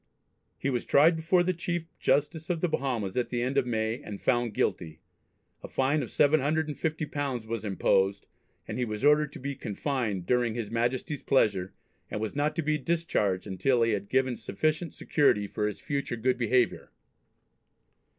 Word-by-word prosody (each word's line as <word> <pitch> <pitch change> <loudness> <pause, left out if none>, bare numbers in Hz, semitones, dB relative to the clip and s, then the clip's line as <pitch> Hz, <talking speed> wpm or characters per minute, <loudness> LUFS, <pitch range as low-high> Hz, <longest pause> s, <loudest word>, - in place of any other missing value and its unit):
He 140 - -1
was 125 - -1
tried 160 +4 +5
before 170 +3 +2
the 185 +1 +1
Chief 175 -1 -3
Justice 155 +3 +1
of 175 -2 0
the 180 - +1
Bahamas 125 - -2
at 125 - 0
the 120 -1 -1
end 130 +2 -1
of 135 -3 +2
May, 110 +2 -1
and 100 -7 -7
found 120 -3 +1
guilty. 85 -5 -1 0.6
A - - -7
fine 140 +3 +1
of - - -5
£750 150 -3 0
was 115 -1 -4
imposed, 95 -1 +1 0.4
and - - -4
he - - +1
was 105 +3 -3
ordered 150 0 +4
to - - -8
be 140 +1 -3
"confined 110 -5 -2
during 120 0 +1
his 115 -4 -4
Majesty's 125 +5 -1
pleasure," 95 -8 +2 0.4
and - - -3
was 110 +3 -3
not 150 +1 0
to 165 - -1
be 155 +1 +1
discharged 130 - 0
until 115 +5 +1
he 115 - +2
had 100 -1 -2
given 130 -1 +2
"sufficient 155 +6 -1
security" 140 -9 +2
for 105 +1 -2
his 105 - -5
future 140 -4 -2
good 125 +2 +1
behaviour. 120 0 +1
130 Hz, 170 wpm, -28 LUFS, 110-150 Hz, 0.6 s, tried